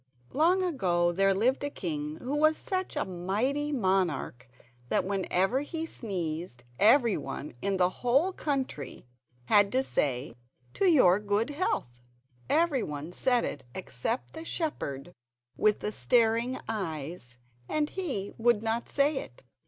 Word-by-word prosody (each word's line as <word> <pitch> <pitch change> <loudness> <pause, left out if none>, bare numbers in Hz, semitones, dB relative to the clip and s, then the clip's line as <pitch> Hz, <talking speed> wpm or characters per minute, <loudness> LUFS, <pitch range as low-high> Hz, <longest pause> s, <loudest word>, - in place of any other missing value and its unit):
Long, 345 +6 +3
long 360 -2 0
ago 175 -8 +2
there 195 +3 +3
lived 235 +9 +1
a 285 - -1
king 150 - -4
who 265 +4 -3
was 310 +1 +4
such 375 -1 -3
a - - 0
mighty 210 +12 -1
monarch 185 - 0 0.4
that - - +2
whenever 195 +4 +1
he 320 +2 -4
sneezed 170 - -5 0.2
every 230 +1 +5
one 150 - -6
in 200 -1 0
the 180 0 +3
whole 275 +10 +3
country 265 - -3 0.4
had 205 +6 +4
to 260 +1 +3
say 135 - -1 0.4
"To 395 - +2
your 205 - +6
good 210 +5 0
health!" 205 - -2 0.5
Every 315 -6 +3
one 150 0 -5
said 245 +5 +2
it 140 - -5
except 190 - -3
the 320 - -7
shepherd 175 - -3 0.4
with 215 -1 +2
the 210 - -2
staring 235 +2 +2
eyes, 160 - -5 0.3
and 300 -1 0
he 270 - -3
would 225 -2 +3
not 225 +1 -1
say 285 +1 +2
it. 125 - -8
215 Hz, 145 wpm, -29 LUFS, 175-280 Hz, 0.5 s, your